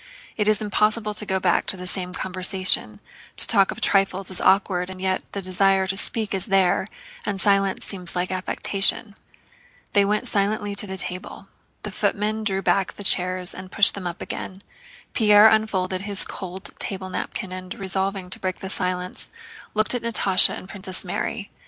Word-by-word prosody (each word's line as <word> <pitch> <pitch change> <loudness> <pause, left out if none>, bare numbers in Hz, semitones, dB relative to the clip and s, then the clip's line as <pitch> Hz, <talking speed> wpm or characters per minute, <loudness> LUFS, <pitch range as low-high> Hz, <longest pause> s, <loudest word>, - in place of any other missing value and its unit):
It 210 -2 -1
is 215 0 +2
impossible 210 +1 +1
to 210 0 -3
go 190 -1 0
back 180 -2 +1
to 190 - -2
the 180 - -8
same 180 0 -2
conversation, 185 - +2 0.4
to - - +7
talk 195 -1 +4
of - - -6
trifles 195 -1 +1
is 185 - -1
awkward, 185 -2 +1
and 190 0 -9
yet 190 0 -1
the 200 - -5
desire 190 +1 +2
to 190 +1 -3
speak 215 +2 +4
is 195 +1 +2
there 190 -1 +2 0.4
and 200 -2 -4
silence 195 -1 +1
seems 180 -3 -6
like 180 +1 -2
affectation. 195 +3 0 0.8
They 200 - +3
went 210 +1 0
silently 205 0 -1
to 200 -1 -2
table. 185 +1 -3 0.3
The 210 - -4
footmen 210 +2 -2
drew 195 -2 -1
back 195 -1 0
the 205 - -9
chairs 185 -1 +2
and 185 0 -10
pushed 200 - +4
them 190 -3 -6
up 170 - -6
again. 190 +1 -7 0.5
Pierre 210 -1 +6
unfolded 190 -4 0
his 200 0 +4
cold 190 0 -8
table 190 -1 -4
napkin 185 0 -5
and, 185 0 -8
resolving 190 -1 -3
to - - -4
break 185 -1 -3
the 190 - -6
silence, 180 -1 -3 0.5
looked 215 +2 +1
at 245 - -1
Natásha 205 -5 +3
and - - -9
at 185 - -15
Princess 190 -2 -2
Mary. 205 +3 -4
195 Hz, 175 wpm, -22 LUFS, 185-205 Hz, 0.8 s, to